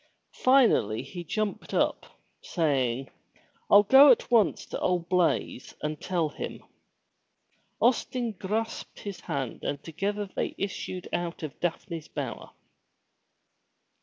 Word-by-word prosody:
Finally 245 - +4
he 175 -2 -7
jumped 210 +4 -3
up, - - +1 0.3
saying: 135 -6 0 0.3
" - - -36
Fll 205 0 +7
go 275 +4 +9
at 245 -2 +4
once 225 -5 +3
to - - -5
old 175 -2 0
Blaize 170 -7 0
and 150 0 -3
tell 170 -4 0
him.'* - - -7 1.2
Austin 245 0 +1
grasped 215 +3 -4
his 200 -2 -6
hand 140 -8 -4
and 140 0 -3
together 200 +6 -2
they - - -2
issued 185 -2 -4
out 175 -1 -3
of 150 -4 -6
Daphne's 170 -2 -3
Bower. - - -5
180 Hz, 120 wpm, -28 LUFS, 155-210 Hz, 1.2 s, go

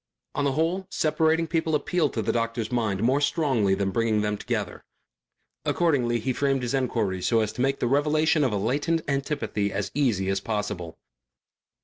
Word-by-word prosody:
On 145 - -1
the 140 - +1
whole 170 +6 0
separating 160 +1 +1
people 160 -1 0
appealed 150 0 0
to 115 - -1
a 110 +2 0
doctor's 115 -1 -2
mind 110 -5 0
more 130 +5 +3
strongly 135 - +2
than 95 0 -1
bringing 110 0 +1
them 105 0 0
together. - - -4 0.8
Accordingly 135 -9 +1
he 130 +4 -1
framed 135 -1 0
his 125 - -2
enquiries 110 -8 0
so 115 - +3
as 110 - -2
to - - -4
make 135 +1 +1
the - - -1
revelation 150 +3 +2
of 130 - +1
a 105 - 0
latent 145 +10 0
antipathy 140 -7 -1
as 100 0 -3
easy 115 -10 +1
as 95 0 +1
possible. 105 -5 -4
125 Hz, 175 wpm, -26 LUFS, 105-150 Hz, 0.8 s, more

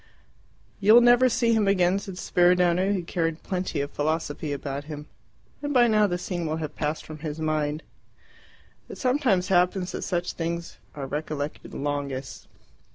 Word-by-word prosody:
"You 210 +2 +6
will 240 - +9
never 245 +1 +6
see 230 0 +2
him 215 -3 +2
again," 185 -1 +3
said 195 -2 -8
Spiridione, 180 +1 +3
who 185 - -2
carried 165 -1 -2
plenty 180 -6 -2
of 140 +1 -4
philosophy 155 0 -2
about 140 0 -4
him. 150 -1 -7 0.6
"And 290 -1 -3
by 245 -1 +7
now 215 -2 +4
the 175 -2 -1
scene 175 -2 -3
will 155 - -1
have 155 -2 -5
passed 150 +1 -2
from 155 -1 -9
his 150 0 -5
mind." 155 0 -1 1.1
"It - - -8
sometimes 250 -9 +1
happens 180 0 +2
that - - -5
such 175 0 -2
things 170 0 -4 0.2
are 140 -2 -4
recollected 150 +1 -5
longest. 140 -2 -4
170 Hz, 160 wpm, -26 LUFS, 150-195 Hz, 1.1 s, will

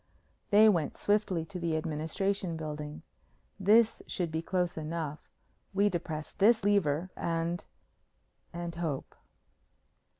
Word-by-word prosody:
They 210 +2 +7
went 170 -8 +2
swiftly 205 -5 +1
to 185 +1 -7
the 165 -2 0
Administration 165 +4 -1
Building. 150 -1 -6 0.6
"This 215 +4 +4
should 175 -3 -2
be 160 0 -1
close 180 0 -1
enough. 155 -1 -4 0.5
We 200 +1 +4
depress 160 -4 -4
this 220 +2 +4
lever 185 -4 +2
and 165 +1 -1 0.9
and 170 0 -5
hope." 160 -5 -3
170 Hz, 110 wpm, -31 LUFS, 160-195 Hz, 0.9 s, They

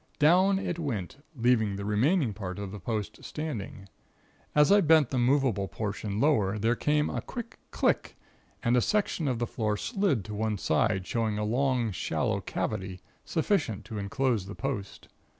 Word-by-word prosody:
Down 185 +6 +5
it 175 -3 -3
went, 120 - -3 0.2
leaving 115 -4 +2
the 100 0 -5
remaining 120 - +2
part 95 -2 -6
of 100 -2 -5
the 105 - -7
post 105 +1 -4
standing. 120 -10 -5 0.7
As 150 +2 +5
I 205 0 +7
bent 155 -5 +4
the 130 - +1
movable 125 -6 +2
portion 105 0 -4
lower 110 -9 +2
there 115 +3 +2
came 150 +3 +1
a - - -3
quick 235 -2 -8
click - - 0 0.5
and 120 +1 +3
a 125 - +4
section 190 - 0
of 125 -3 0
the 120 - 0
floor 110 -4 -1
slid 195 - 0
to 105 - -6
one 110 0 -1
side, 95 +3 +1
showing 110 -1 -1
a 105 - -1
long, 125 0 +1
shallow 85 - -1
cavity, 95 -1 -3 0.3
sufficient 155 - 0
to 110 0 -5
enclose 115 -1 0
the 100 - -7
post. 115 -8 -5
115 Hz, 170 wpm, -28 LUFS, 105-145 Hz, 0.7 s, I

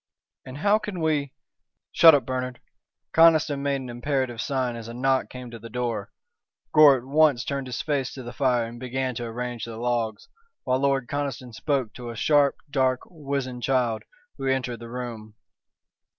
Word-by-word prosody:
"And 130 +1 -8
how 205 +7 +3
can 205 -4 -5
we 150 -4 0 0.3
" - - -59
"Shut 165 -2 +8
up, 140 - 0
Bernard!" 130 -1 -3 0.5
Conniston 160 -3 +5
made 140 -1 0
an 130 - -7
imperative 120 -1 -2
sign 130 -4 -1
as 115 -1 -7
a 115 - -7
knock 130 +1 +1
came 125 -1 -9
to 115 - -8
the 115 +1 -10
door. 115 -3 -3 0.6
Gore 150 -3 +8
at 120 - -8
once 140 -2 +3
turned 140 -1 -3
his 120 -3 -4
face 140 -4 -1
to 130 - -7
the 120 0 -8
fire 125 -2 +1
and 120 +1 -9
began 130 +1 -2
to 120 0 -4
arrange 120 0 -4
the 115 -1 -8
logs, 115 -2 -2 0.4
while 130 0 +1
Lord 135 -2 +1
Conniston 140 -4 -4
spoke 130 -3 -1
to 120 -1 -8
a 115 - -6
sharp, 145 +3 +3 0.2
dark, 130 -2 +2
wizen 140 -6 -4
child 125 -4 +1 0.4
who 135 - -3
entered 125 -3 -1
the 115 0 -9
room. 115 -3 -7
130 Hz, 180 wpm, -25 LUFS, 120-140 Hz, 0.6 s, Shut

